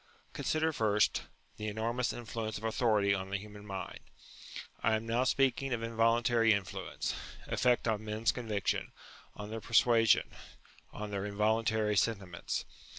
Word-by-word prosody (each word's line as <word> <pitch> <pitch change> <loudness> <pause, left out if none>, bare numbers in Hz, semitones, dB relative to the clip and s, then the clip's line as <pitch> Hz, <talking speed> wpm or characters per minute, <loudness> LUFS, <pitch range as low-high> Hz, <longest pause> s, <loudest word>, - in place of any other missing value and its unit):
Consider 160 +1 0
first, 105 -4 +2 0.3
the 105 - -4
enormous 115 +3 -1
influence 110 -2 -4
of 105 - -10
authority 110 -3 +2
on 95 -1 -3
the 100 - -1
human 105 +1 -11
mind. 95 -2 -5 0.8
I 110 0 +3
am 110 +1 -3
now 120 +3 +1
speaking 135 0 +2
of 115 -1 -2
involuntary 115 0 +3
influence; 100 -3 -3 0.3
effect 125 -1 +2
on 110 -1 0
men's 110 +1 0
conviction, 110 -5 -2 0.4
on 105 0 -7
their 115 0 -4
per 115 - -12
suasion, 115 -1 +5 0.6
on 105 0 -6
their 100 -1 -2
involuntary 110 +1 +1
sentiments. 95 -5 -1
110 Hz, 140 wpm, -32 LUFS, 105-115 Hz, 0.8 s, suasion